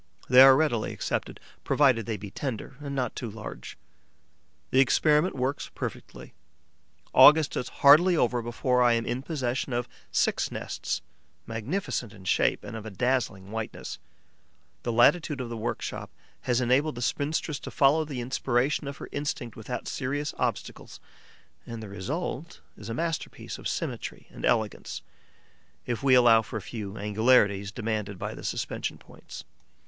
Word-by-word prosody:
They 125 +1 +8
are 135 0 +10
readily 130 -7 +1
accepted, - - -3 0.2
provided 130 -7 +3
they 110 -2 -2
be 100 -1 -9
tender 130 +1 -5
and 140 -1 -5
not 125 -4 -2
too 120 - -4
large. 110 +1 -8 0.9
The 130 - +4
experiment 150 +5 +3
works 130 +2 -2
perfectly. - - -7 0.8
August 150 +3 +7
is - - -3
hardly 165 +5 +6
over 120 -3 +2
before 125 +2 0
I 120 -1 +5
am 115 0 0
in 125 +2 -2
possession 130 -4 -2
of 120 0 -1 0.2
six - - +1
nests, - - -4 0.4
magnificent 115 - -3
in 95 -3 -14
shape 95 - +1
and - - -7
of 110 - -6
a 110 - -6
dazzling 110 -4 -1
whiteness. 110 -1 -5 0.8
The 120 - -2
latitude 140 +5 +3
of 125 -2 -4
the 120 - -5
workshop 115 +1 -4 0.4
has 120 0 +3
enabled 130 +4 +2
the 120 - -6
spinstress 145 +3 -1
to - - -7
follow 155 +1 +3
the 140 -5 -5
inspiration 130 +3 0
of 140 - -6
her - - -8
instinct 145 -5 -4
without 115 +2 -6
serious 145 +2 -2
obstacles; - - -3 0.7
and 115 -1 -6
the 105 - -8
result 145 - -5 0.2
is - - -10
a 115 - -3
masterpiece 165 +4 -4
of - - -4
symmetry - - -4
and - - -5
elegance, 110 -3 -1 0.8
if 120 -2 -3
we 135 -2 +5
allow 120 -3 +6
for 110 - -6
a - - -5
few 105 -3 -6
angularities 105 -1 +3
demanded 105 -3 -3
by - - -4
the - - -10
suspension - - -3
points. - - -12
125 Hz, 155 wpm, -27 LUFS, 115-140 Hz, 0.9 s, are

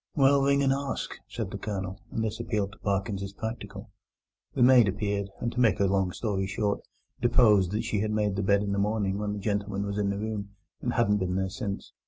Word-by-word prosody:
"Well, 140 0 +5
ring 140 0 +3
and 135 0 +4
ask," 140 0 -3 0.2
said - - -4
the - - -5
Colonel, 95 -2 -4
and 110 - -2
this 110 0 -2
appealed 105 -4 -1
to - - -16
Parkins 100 0 -1
as 100 0 -5
practical. 110 +3 -6 0.6
The - - +4
maid 125 -3 +7
appeared, 100 0 -1
and, 120 - -1
to 125 - -4
make 115 -3 +4
a 100 - +4
long 95 -1 +1
story 95 -2 -2
short, 100 +1 -1 0.4
deposed 110 -6 +5
that 110 - 0
she 105 - -1
had 105 +1 0
made 105 -2 0
the 100 - 0
bed 100 +1 +3
in 100 - -2
the 100 - 0
morning 100 -1 0
when 105 -1 -2
the - - -4
gentleman 100 -1 -1
was 100 0 -3
in 100 -1 +1
the 100 - -1
room, 100 -1 -4 0.3
and - - -1
hadn't 105 +1 +3
been 90 -2 -1
there 95 0 0
since. 100 -1 -5
105 Hz, 230 wpm, -28 LUFS, 100-110 Hz, 0.6 s, maid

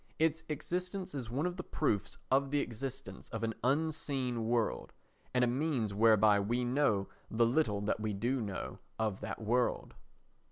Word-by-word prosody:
Its 160 0 +2
existence 180 +4 -3
is 130 -5 -4
one 135 +7 -1
of 180 0 -2
the 180 - -4
proofs 110 - -1
of 135 +1 +3
the 145 +1 +2
existence 135 +2 -5
of 115 -1 -4
an 115 0 0
unseen 135 -4 0
world, 115 -2 0 0.4
and 125 -1 +3
a - - +4
means 125 -5 0
whereby 110 -1 +5
we 120 +5 0
know 120 -6 +2 0.2
the 115 +1 +3
little 115 -5 +2
that 105 +1 0
we 110 0 -1
do 120 +6 0
know 100 -4 -4 0.2
of 110 -3 -1
that - - -5
world. 120 +3 0
125 Hz, 165 wpm, -33 LUFS, 110-145 Hz, 0.4 s, whereby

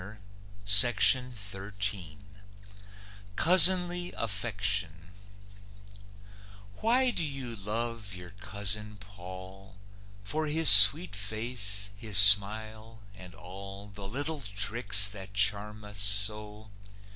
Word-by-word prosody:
COUSINLY 120 +4 +1 2.8
AFFECTION 100 -5 -6 1.7
Why 250 +3 -2
do 170 - -7
you 135 -5 -8
love 110 0 -9
your 90 -1 -15
Cousin 105 +1 -7
Paull? 95 -1 -16 0.5
For 155 +10 -7
his 160 +1 +5
sweet 100 -2 +8
face, 105 -1 -4
his 105 -2 -2
smile, 110 +2 +2
and 90 -2 -17
all 100 +2 -15
The 100 0 -12
little 145 +7 -6
tricks 105 -1 0
that 100 -1 -13
charm 105 +1 -4
us 105 -1 -9
so? 105 +1 -4
105 Hz, 85 wpm, -24 LUFS, 100-110 Hz, 2.8 s, sweet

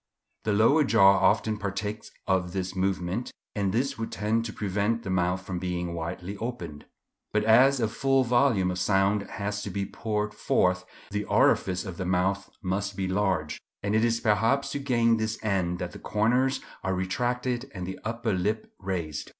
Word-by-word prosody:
The 110 - +2
lower 115 +9 +5
jaw 100 -7 +6
often 110 -1 +2
partakes 105 +1 -4 0.2
of 90 -2 0
this 95 -1 -3
movement, 95 +3 -1 0.2
and 100 -2 0
this 125 +3 -1
would 115 - -3
tend 110 +4 0
to 110 - -4
prevent 105 +3 -1
the 95 - -3
mouth 90 0 0
from 90 -2 -3
being 90 -1 -3
widely 90 +4 -5
opened. 90 -11 -6 0.5
But 105 - +1
as 130 +5 +5
a 115 - +2
full 135 +4 +2
volume 120 -6 +3
of 90 - -3
sound 95 +2 +2
has 105 0 -3
to - - -4
be 100 -1 -2
poured 105 0 -3
forth, 90 0 +1 0.3
the 105 0 -2
orifice 90 0 +2
of 95 -4 -6
the 95 - -3
mouth 95 +2 0
must 95 +1 -2
be 95 -1 -1
large; 95 -5 0 0.2
and 100 0 0
it 110 +1 +3
is 115 0 +2
perhaps 115 +6 +2
to 145 - -2
gain 115 -4 +2
this 110 0 -2
end 95 -4 0
that 90 0 -4
the - - -10
corners 125 +5 +1 0.2
are 95 0 0
retracted 125 +7 -1
and 90 -3 -6
the 95 +1 -6
upper 115 -1 -2
lip 105 +4 -2
raised. 85 -6 -4
100 Hz, 180 wpm, -27 LUFS, 95-115 Hz, 0.5 s, jaw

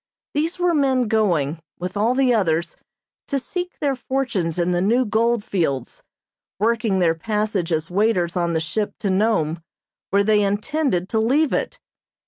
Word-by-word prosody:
These 320 +5 -1
were 355 -1 +2
men 265 -5 +2
going, 175 -9 +1 0.2
with 180 +2 -5
all 220 +5 +2
the 260 -2 +3
others, 170 -6 0 0.5
to 280 - 0
seek 355 +7 -4
their 280 -2 0
fortunes 245 -11 -2
in 175 0 +1
the 175 0 +1
new 235 +7 +2
gold 230 +1 +1
fields, 155 - -2 0.6
working 220 -1 +1
their 170 -3 +3
passage 210 0 -2
as 160 +1 -1
waiters 185 -3 +1
on 170 -1 0
the 160 - +1
ship 205 +7 -2
to 200 - 0
Nome, 185 -6 +1 0.5
where 200 +1 +3
they 210 0 +3
intended 205 - 0
to 220 - +1
leave 270 +7 +2
it. - - -2
210 Hz, 160 wpm, -22 LUFS, 175-245 Hz, 0.6 s, the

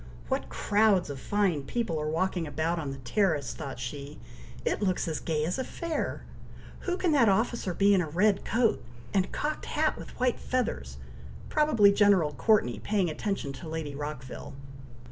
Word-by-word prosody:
"What - - -1
crowds 205 -6 +2
of 135 - -6
fine 195 -4 +1
people 165 - -2
are 150 - -1
walking 170 +1 0
about 160 +4 -1
on 150 -3 -3
the 135 - -5
terrace!" 150 - 0
thought 140 -4 -6
she. 140 +4 -6 0.5
"It - - 0
looks 185 -3 0
as 160 -2 -2
gay 155 -2 -1
as 180 +9 -2
a - - 0
fair! 335 +4 -3 0.5
Who 360 -1 -2
can 360 -3 +1
that 265 -8 +5
officer 200 -2 0
be 200 0 +5
in 190 - +4
a 160 - -3
red 195 +5 +2
coat, 230 -1 +1 0.3
and 190 -2 +1
cocked 300 +1 -3
hat - - 0
with - - -10
white 250 -1 +1
feathers. 65 - -2 0.5
Probably 235 -10 +5
General 200 -7 +4
Courteney 130 - +2
paying 195 -6 0
attention 175 -5 -3
to 160 +4 -8
Lady 160 -3 -4
Rockville. 140 -3 -6
180 Hz, 170 wpm, -29 LUFS, 150-210 Hz, 0.5 s, that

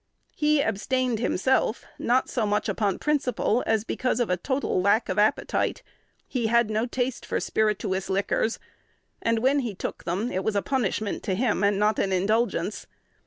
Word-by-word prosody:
He 300 -1 +3
abstained 250 +3 0
himself, 245 +2 +1
not 255 +2 +2
so 225 -4 -1
much 205 0 0
upon 200 -3 0
principle, 260 -5 0
as 220 -1 +2
because 250 +1 -1
of 235 -6 0
a - - +3
total 260 0 -1
lack 205 +4 +2
of 185 - 0
appetite. 210 +1 +1 0.4
He 240 -4 -1
had 235 -1 +3
no 220 +3 0
taste 250 0 -2
for - - -2
spirituous 205 -3 -1
liquors; 200 +3 0 0.6
and, 230 0 +1
when 265 +5 +3
he 235 -7 -3
took - - -5
them, 195 +8 -1
it 185 - -2
was 220 - -1
a 200 - +1
punishment 220 -5 -1
to 190 - 0
him, 230 +1 +1 0.2
not 210 +1 +2
an 195 - +1
indulgence. 200 0 0
220 Hz, 165 wpm, -26 LUFS, 200-250 Hz, 0.6 s, He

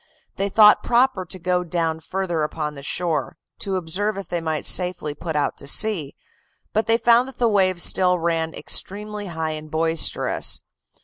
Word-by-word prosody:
They 200 +1 -1
thought 210 +1 +6
proper 240 -6 +2
to 185 - -6
go 180 0 0
down 165 -2 -1
further 175 0 -3
upon 150 0 -3
the 140 - -9
shore, 165 +2 -2 0.2
to 195 -1 -1
observe 190 +4 -2
if 195 - -7
they 175 -1 -2
might 160 -2 -3
safely 180 -5 +1
put 160 +2 -5
out 145 -1 0
to 140 - -5
sea; 170 -4 +2 0.6
but 220 +1 0
they 225 0 +4
found 240 +1 +4
that 265 - -10
the 240 - +2
waves 185 -4 +2
still 180 -1 +4
ran 165 -1 -1
extremely 210 +1 -4
high 160 -2 -3
and 155 0 -7
boisterous. 160 +1 0
180 Hz, 175 wpm, -22 LUFS, 160-205 Hz, 0.6 s, thought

